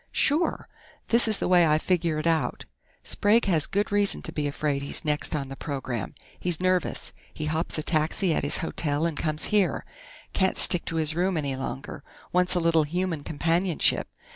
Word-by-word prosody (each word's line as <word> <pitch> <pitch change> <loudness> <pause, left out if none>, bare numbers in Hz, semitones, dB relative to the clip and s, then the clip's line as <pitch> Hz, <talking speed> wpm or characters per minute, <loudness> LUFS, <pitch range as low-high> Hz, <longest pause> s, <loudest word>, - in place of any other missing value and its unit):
"Sure. 310 +5 0 0.4
This 235 0 +6
is 215 -2 +4
the - - -2
way 175 -2 +5
I 155 0 +3
figure 170 -1 0
it 155 - -3
out: 160 -6 0 0.4
Sprague 215 +3 +2
has 165 -6 +1
good 205 +2 -1
reason 205 -1 +2
to - - -5
be 150 -1 -2
afraid 145 -1 -2
he's 140 - -3
next 150 +1 0
on 140 -3 -4
the 135 - -7
program. 130 - -5 0.2
He's 175 -3 0
nervous. 185 -1 -1 0.2
He 155 - -6
hops 160 +2 -1
a 155 - -2
taxi 160 +3 +1
at - - 0
his 145 - 0
hotel 150 -1 -1
and 165 -2 -2
comes 155 0 -1
here 205 -3 +1 0.5
can't 190 -1 +1
stick 180 - +5
to 165 - -4
his 155 -1 +2
room 180 +2 0
any 140 -3 -2
longer. 135 +1 -6 0.3
Wants 180 +1 +2
a - - +2
little 165 -1 +3
human 165 +1 -2
companionship. 165 +3 0
165 Hz, 190 wpm, -26 LUFS, 150-185 Hz, 0.5 s, This